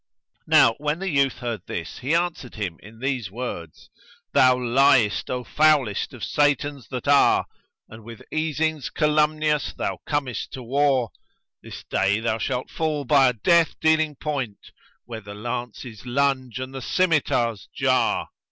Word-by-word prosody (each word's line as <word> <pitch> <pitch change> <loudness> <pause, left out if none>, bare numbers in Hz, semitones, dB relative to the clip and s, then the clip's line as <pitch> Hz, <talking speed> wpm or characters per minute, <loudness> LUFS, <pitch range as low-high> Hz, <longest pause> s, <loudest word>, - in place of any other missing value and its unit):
Now 115 - +6
when 150 +1 -1
the 195 +1 -3
youth 140 -2 +2
heard 120 -5 -4
this 85 -1 -6
he 140 +6 0
answered 170 -7 -2
him 95 -7 -4
in 110 +3 -14
these 130 -7 -2
words, 95 -8 -7 0.4
"Thou 130 -1 +5
liest, 125 -3 +3
O 125 0 -2
foulest 150 -6 +2
of - - -10
Satans 145 -2 0
that 130 +1 -6
are, 140 0 +4 0.2
* - - -59
And 110 0 -13
with 115 0 -11
easings 155 -2 -1
calumnious 150 -1 +1
thou - - -3
comest 140 -5 -2
to 130 - -7
war 135 -2 +1 0.5
This - - -10
day 100 +2 +1
thou 115 0 -1
shalt 130 +1 -3
fall 155 -3 -2
by 135 0 +5
a 125 - +2
death 165 +9 +2
dealing 155 -1 +2
point 135 -9 -5
* - - -34
Where 115 -2 -7
the 100 0 -10
lances 120 0 -6
lunge 130 -2 0
and 130 +1 -6
the 135 - -6
scymitars 130 - 0
jar!" - - +1
130 Hz, 155 wpm, -23 LUFS, 115-150 Hz, 0.5 s, Now